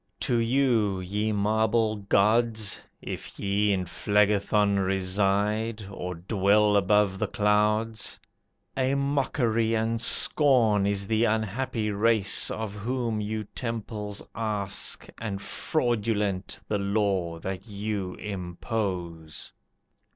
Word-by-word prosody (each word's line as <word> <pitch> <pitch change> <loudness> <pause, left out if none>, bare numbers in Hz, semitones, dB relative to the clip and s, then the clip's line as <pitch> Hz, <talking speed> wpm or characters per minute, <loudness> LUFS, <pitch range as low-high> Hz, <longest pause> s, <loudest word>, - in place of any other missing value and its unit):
To 125 -3 +1
you, 115 -5 +2
ye 105 +4 -2
marble 110 +1 +1
gods 110 +1 +1 0.2
(If - - -7
ye 100 +1 +1
in 95 -2 0
Phlegethon 105 +1 +2
reside, 100 +3 0
or 90 -2 -5
dwell 100 +3 +2
Above 100 -1 +2
the - - 0
clouds), 105 +2 0 0.6
a 130 +1 +1
mockery 130 -5 0
and 115 +1 -1
scorn 115 -6 +5
Is 100 -1 0
the 110 +3 +2
unhappy 110 +1 -1
race, 105 -1 +2
Of 110 -2 -4
whom 115 0 -2
you 110 +1 -3
temples 105 -2 -5
ask, 105 -3 -2
And 105 -4 -4
fraudulent 105 -7 -1
the 105 - -1
law 100 -4 0
that 95 +4 -6
you 100 -2 -4
impose. 90 -4 -5
105 Hz, 105 wpm, -27 LUFS, 100-115 Hz, 0.6 s, scorn